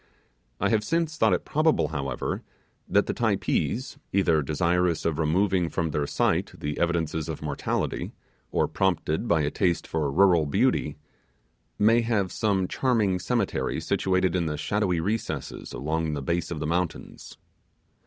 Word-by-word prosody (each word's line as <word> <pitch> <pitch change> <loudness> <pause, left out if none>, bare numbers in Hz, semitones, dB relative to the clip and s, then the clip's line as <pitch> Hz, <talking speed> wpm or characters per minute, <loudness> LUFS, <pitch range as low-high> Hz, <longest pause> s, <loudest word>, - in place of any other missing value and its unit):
I 100 - +1
have 110 -2 +2
since 165 +4 0
thought 110 -8 +3
it - - -5
probable, 155 +1 +2
however, 70 -4 -3 0.5
that - - +3
the - - -2
Typees, 130 +3 -1
either 85 -5 +3
desirous 85 +4 +1
of 80 -1 0
removing 90 +2 +2
from 80 -2 -1
their 75 0 -1
sight - - 0
the 75 0 -4
evidences 80 -2 0
of 80 -1 -5
mortality, 75 -2 -2 0.4
or - - +2
prompted 95 +1 0
by 80 -6 +3
a 75 0 0
taste 90 -4 0
for 75 -3 -1
rural 85 -2 +4
beauty, 75 - +1 0.8
may 115 +3 +4
have 110 -5 0
some 100 -4 +1
charming 110 -8 +1
cemetery 115 +2 -1
situation 95 -1 +1
in 85 -3 0
the 75 -1 -2
shadowy 95 +1 0
recesses 85 -6 -3
along 80 +5 -2
the 70 - -4
base 85 +5 -1
of 85 - -4
the 75 - -3
mountains. 85 +1 -3
85 Hz, 150 wpm, -26 LUFS, 80-100 Hz, 0.8 s, rural